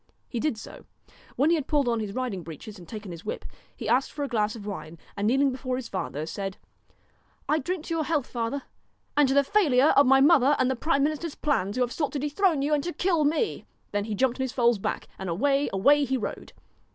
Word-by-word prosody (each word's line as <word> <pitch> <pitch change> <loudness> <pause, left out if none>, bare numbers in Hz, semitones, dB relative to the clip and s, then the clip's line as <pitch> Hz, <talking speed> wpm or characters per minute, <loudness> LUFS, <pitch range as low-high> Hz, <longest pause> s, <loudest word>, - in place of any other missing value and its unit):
He 240 - -4
did 300 -3 0
so. - - -11 0.5
When 290 +5 +3
he - - +5
had 300 -4 -3
pulled 290 -4 +2
on 235 -1 +1
his 210 -2 -3
riding 245 -7 -3
breeches 170 +6 -9
and 170 -2 -13
taken 210 -4 -7
his 170 -1 -9
whip, 210 - -5 0.3
he - - -6
asked 260 +2 +2
for 290 - -4
a - - -1
glass 215 -4 0
of 210 -3 -9
wine, 170 -5 -6 0.2
and 205 +1 -1
kneeling 270 +3 +3
before 255 0 -3
his 255 -2 -5
father, 155 -5 -3
said: 195 +3 -5 0.5
' - - -38
I 310 - +2
drink 345 +3 -3
to 335 - -3
your 320 -2 0
health, 300 -6 0
father, 240 +3 -3 0.5
and 295 -1 +5
to 270 - +1
the 280 - +6
failure 290 -5 +4
of 280 - +6
my 270 +1 +6
mother's 285 -1 +5
and 260 0 +2
the - - -1
prime 280 +2 +1
minister's 310 +1 -2
plans, 220 -9 0
who 255 - +2
have 245 - -2
sought 295 -3 -2
to - - -1
dethrone 295 +1 +1
you 300 +2 +1
and 290 -2 +1
to 350 - -3
kill 340 -5 +1
me.' 315 +9 0 0.2
Then 205 0 -1
he 215 -1 -3
jumped 255 +3 +1
on - - -1
his 260 - -3
foal's 235 -3 +3
back - - -3
and 190 - -4
away, 275 +11 +1
away 285 +10 +4
he 265 0 0
rode. 225 - -6
260 Hz, 245 wpm, -27 LUFS, 215-295 Hz, 0.5 s, the